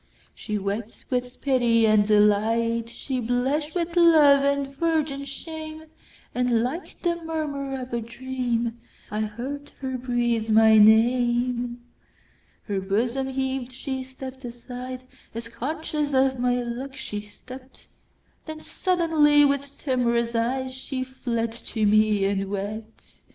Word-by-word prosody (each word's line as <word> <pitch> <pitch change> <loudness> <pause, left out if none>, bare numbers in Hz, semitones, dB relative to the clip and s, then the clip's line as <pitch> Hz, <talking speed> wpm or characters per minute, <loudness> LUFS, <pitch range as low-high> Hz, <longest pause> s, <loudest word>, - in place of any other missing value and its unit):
She 210 -1 -4
wept 205 +3 -4
with 250 0 -2
pity 240 -4 +3
and 215 -1 +4
delight, 225 +2 +3
She 260 +2 -4
blush'd 260 +7 -1
with 340 -1 -2
love 310 -5 +6
and 280 -1 0
virgin 305 -3 0
shame; 315 +2 -7 0.5
And 245 -2 +2
like 290 +9 -5
the 340 -1 0
murmur 285 -4 -3
of 250 -1 -7
a 235 - 0
dream,I 235 -2 -4
heard 255 +7 -4
her 260 -1 -3
breathe 240 -3 0
my 220 0 +6
name. 240 +2 +3 0.8
Her 200 -2 -2
bosom 235 +7 0
heaved—she 265 0 -3
stepp'd 260 0 -9
aside, 250 +1 -7 0.3
As 230 0 -5
conscious 300 +3 -3
of 265 -1 +3
my 245 0 +2
look 255 +3 -5
she 210 -6 -5
stept—Then 255 +7 -14
suddenly, 315 -5 +3
with 280 0 -1
timorous 235 -3 0
eyeShe 260 +2 -2
fled 235 -3 -2
to 225 -1 -2
me 210 -1 +4
and 195 0 -1
wept. 210 +3 -6
250 Hz, 120 wpm, -25 LUFS, 230-275 Hz, 0.8 s, love